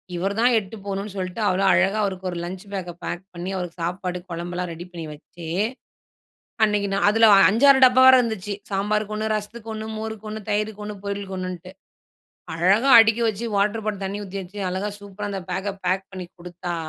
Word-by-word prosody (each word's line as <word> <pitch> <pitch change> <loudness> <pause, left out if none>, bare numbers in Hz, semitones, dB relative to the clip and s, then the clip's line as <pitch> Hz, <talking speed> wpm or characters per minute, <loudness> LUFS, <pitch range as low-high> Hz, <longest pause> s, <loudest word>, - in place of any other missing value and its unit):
இவர் 195 +3 -1
தான் 245 +1 +4
எட்டு 200 +2 -10
போவணும்ன்னு 200 0 -4
சொல்லிட்டு 185 +3 -4
அவ்வளோ 190 +1 +1
அழகா 190 +4 +3
அவருக்கு 190 -1 -3
ஒரு 175 - -5
லஞ்ச் 185 +2 -6
பேக்க 180 -3 -4
பேக் 175 - -4
பண்ணி 175 +1 -5
அவருக்கு 175 -1 -6
சாப்பாடு 180 +1 -3
குழம்பெல்லாம் 175 +1 -4
ரெடி 170 +2 -8
பண்ணி 165 -2 -7
வச்சு. 165 +2 -12 1.2
அன்னைக்கு 210 -1 +2
நான் 200 - +2
அதில 225 +1 +5 0.2
5,6 265 +6 +6
டப்பா 255 0 +5
வேற 260 - +10
இருந்துச்சு 210 -3 -3 0.2
சாம்பாருக்கு 210 +2 -1
1, 215 0 -2
ரசத்துக்கு 220 +2 -6
1, 220 0 -5
மோருக்கு 220 -1 -6
1, 215 0 -5
தயிருக்கு 210 0 -1
1, 210 0 -6
பொரியளுக்கு 200 -1 -4
1,ன்னுட்டு 185 0 -6 0.8
அழகா 195 +10 +3
அடிக்க 225 0 +4
வச்சு 220 +2 -4
வாட்டர் 210 +2 +1
பாட்டில் 205 -2 -3
தண்ணி 195 +1 -3
ஊத்தி 195 +1 -7
வச்சு 190 +3 -11
அழகா 190 +3 -2
சூப்பரா 205 0 -7
அந்த 195 -1 -4
பேக்க 190 +3 -2 0.2
பேக் 190 +2 0
பண்ணி 185 -1 -6
குடுத்தா 175 0 -6
195 Hz, 180 wpm, -23 LUFS, 180-215 Hz, 1.2 s, வேற